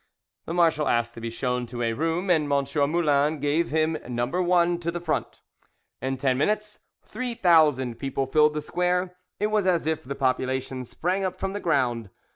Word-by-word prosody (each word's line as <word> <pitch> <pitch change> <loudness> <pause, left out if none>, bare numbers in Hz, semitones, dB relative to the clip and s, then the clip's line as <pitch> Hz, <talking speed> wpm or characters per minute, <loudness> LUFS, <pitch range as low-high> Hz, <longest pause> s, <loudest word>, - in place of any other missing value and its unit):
The 165 - -4
marshal 165 -3 +3
asked 120 0 +1
to 115 - -10
be 115 - -3
shown 125 +1 -2
to 120 +1 -4
a 115 0 0
room, 165 - -1
and 150 -4 +2
M. 140 -1 +2 0.3
Moulin 150 -2 +2
gave 145 +4 +1
him 155 +1 +1
No. 120 0 0
1, 175 +3 +2
to 170 -1 -3
the 175 +1 -3
front. 170 -2 -3 0.6
In 130 0 -2
ten 130 -1 +1
minutes 210 +6 -1 0.2
three 250 -2 -5
thousand 155 - +3
people 135 0 -2
filled 150 +2 +3
the 150 - -1
square; 180 +3 -1 0.2
it 210 +1 0
was 210 -3 +1
as 175 -4 +2
if 160 -1 -1
the 140 +2 -5
population 130 -1 -1
sprang 185 +9 -2
up 185 0 -3
from 195 0 -2
the 205 - -3
ground. 125 - 0
155 Hz, 190 wpm, -25 LUFS, 130-175 Hz, 0.6 s, marshal